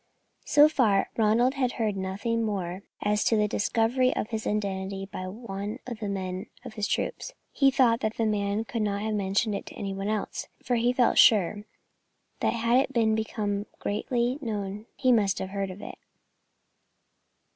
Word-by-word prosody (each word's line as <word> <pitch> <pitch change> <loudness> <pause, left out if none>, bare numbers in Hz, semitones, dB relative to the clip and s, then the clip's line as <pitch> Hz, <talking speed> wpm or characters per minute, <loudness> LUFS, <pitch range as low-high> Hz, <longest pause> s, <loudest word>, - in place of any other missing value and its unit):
So 295 0 +7
far, 230 -10 +2
Ronald 230 +4 +3
had 255 -3 0
heard 215 -3 -1
nothing 200 +5 -2
more 190 -4 -3 0.2
as 210 0 +2
to 225 - +3
the 210 0 +3
discovery 235 +5 +1
of 215 - -2
his 220 -2 -3
identity 195 -2 -2
by 185 -1 -6
one 205 +1 -5
of 235 -3 -6
the 210 -2 -3
men 190 0 -4 0.2
of - - -7
his 210 -2 -2
troop. - - -1 0.3
He 275 -1 +4
thought 250 -4 +3
that 220 -2 -2
the 225 - +1
man 205 0 0
could 230 0 -3
not 205 -1 -1
have 220 0 -1
mentioned 205 +2 0
it 200 - -5
to - - -10
any 195 -1 -4
one 195 +1 -4
else, 215 -1 -2 0.2
for 245 - +1
he 240 +1 +2
felt 250 -1 +3
sure 205 -1 +5 0.7
that - - +1
had 235 +1 +2
it 230 -5 +2
become 210 -2 -2 0.2
generally 240 +5 0
known 210 -3 -4
he 255 -1 +2
must 205 -5 +3
have 190 - -4
heard 195 -1 -2
of 185 +2 -9
it. - - -8
215 Hz, 180 wpm, -27 LUFS, 200-235 Hz, 0.7 s, So